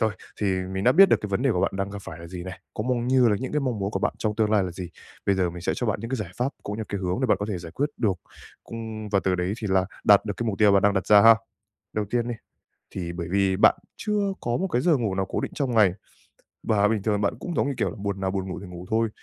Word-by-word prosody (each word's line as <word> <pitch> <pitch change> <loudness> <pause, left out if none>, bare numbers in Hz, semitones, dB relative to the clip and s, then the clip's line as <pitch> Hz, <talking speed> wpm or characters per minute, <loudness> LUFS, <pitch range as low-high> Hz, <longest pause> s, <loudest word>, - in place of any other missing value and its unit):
Rồi, 110 -2 +2 0.3
thì 105 - +1 0.3
mình 95 +1 -2
đã 125 - +6
biết 195 +5 +8
được - - +5
cái 105 - -3
vấn 100 +5 -1
đề 135 - +3
của 90 - 0
bạn - - +2
đang 100 0 -2
gặp 100 - -6
phải 80 - -9
là 85 - -9
gì 90 +1 -7
này, 95 0 -8
cũng 105 +4 -3
mong 120 -1 0
như 130 -2 +5
là 105 - +2
những 130 - -4
cái 150 - +1
mong 125 -5 -1
muốn 100 0 -2
của - - -2
bạn - - 0
trong 105 -1 -1
tương 110 -1 +2
lai 105 -2 +4
là 90 - -4
gì. 90 0 -7 0.4
Bây 100 - +4
giờ 90 -2 +1
mình 85 +1 -8
sẽ - - 0
cho 120 - -2
bạn 105 -2 -1
những 115 +2 -6
cái 130 - 0
giải 105 -7 -5
pháp 125 +2 0
cũng 105 - -4
như 110 - -3
cái 100 - -3
hướng 90 +4 -1
để 130 - +2
bạn 105 -4 +3
có 105 - -3
thể 100 -4 -2
giải 85 -1 -9
quyết 145 - 0
được, 105 -6 +1 0.5
cung 110 -2 -6
và 100 -1 +2
từ 95 - +2
đấy 90 +1 -1
thì 110 - -4
là 95 0 +3 0.2
đạt 100 0 +6
được 105 - -2
cái 120 - -3
mục 100 - -3
tiêu 105 -2 +5
bạn 100 -1 +4
đang 100 0 +3
đặt 95 - -1
ra 105 -1 +7
ha. 115 +1 +9 0.6
Đầu 105 - -1
tiên 120 0 0
đi, 120 - -2 0.6
thì 85 -3 -4
bởi 85 -1 -5
vì 95 -1 +2
bạn - - +6 0.2
chưa 205 -2 0
có 120 0 -1
một 190 - -1
cái 125 -8 0
giờ 165 -4 +3
ngủ 110 -6 -1
nào 95 0 0
cố - - -1
định - - -3
trong 135 -4 -1
ngày, 105 -6 +4 0.7
và 105 -1 +3
bình 105 -2 0
thường 105 -1 +1
bạn 100 - +1
cũng, 175 - -5
giống - - +1
như, 140 - -1
kiểu - - 0
là, - - -8
buồn 100 -1 -3
nào 95 0 0
buồn 95 -1 -3
ngủ - - -5
thì 100 - -9
ngủ 90 0 -9
thôi. 115 0 +1
105 Hz, 320 wpm, -25 LUFS, 95-120 Hz, 0.7 s, ha